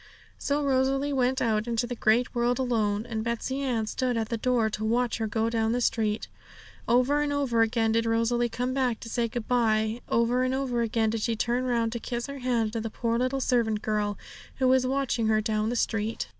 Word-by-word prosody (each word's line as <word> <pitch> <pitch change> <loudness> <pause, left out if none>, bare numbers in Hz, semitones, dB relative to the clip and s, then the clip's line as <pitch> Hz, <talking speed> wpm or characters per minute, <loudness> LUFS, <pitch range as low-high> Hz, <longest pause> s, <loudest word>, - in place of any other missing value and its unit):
So 290 +1 0
Rosalie 270 +1 +1
went 260 0 +1
out 220 -1 0
into 235 0 0
the 245 - -4
great 235 +1 +2
world 240 0 +1
alone, 220 -4 0
and 225 -2 -3
Betsey 235 +3 -2
Ann 240 -5 0
stood 250 +2 -1
at 225 -1 -2
the 235 - -1
door 240 -1 +1
to 215 0 -4
watch 235 +2 0
her 220 - -1
go 220 +1 0
down 225 -1 0
the 245 - 0
street. 220 -3 0 0.6
Over 255 +5 +3
and 295 -1 0
over 270 -5 +1
again 225 0 +2
did 230 +1 +1
Rosalie 230 +1 +1
come 250 +2 -2
back 255 -4 0
to 230 - -8
say 235 0 0
good 230 0 -5
bye, 220 -1 +1
over 235 +2 +2
and 255 +1 +1
over 255 -3 -1
again 225 -1 +1
did 225 -1 -2
she 230 +1 0
turn 240 +3 0
round 235 -2 0
to 235 - -4
kiss 240 +1 -4
her 280 0 -7
hand 235 -4 0
to 225 - -2
the 225 - -4
poor 230 +1 -1
little 255 +2 0
servant 225 -5 +1
girl, 210 -1 -1 0.4
who 260 - +1
was 255 0 +3
watching 265 -4 0
her 215 0 +3
down 215 0 0
the 240 - -2
street. 225 -1 -1
235 Hz, 220 wpm, -27 LUFS, 225-255 Hz, 0.6 s, Over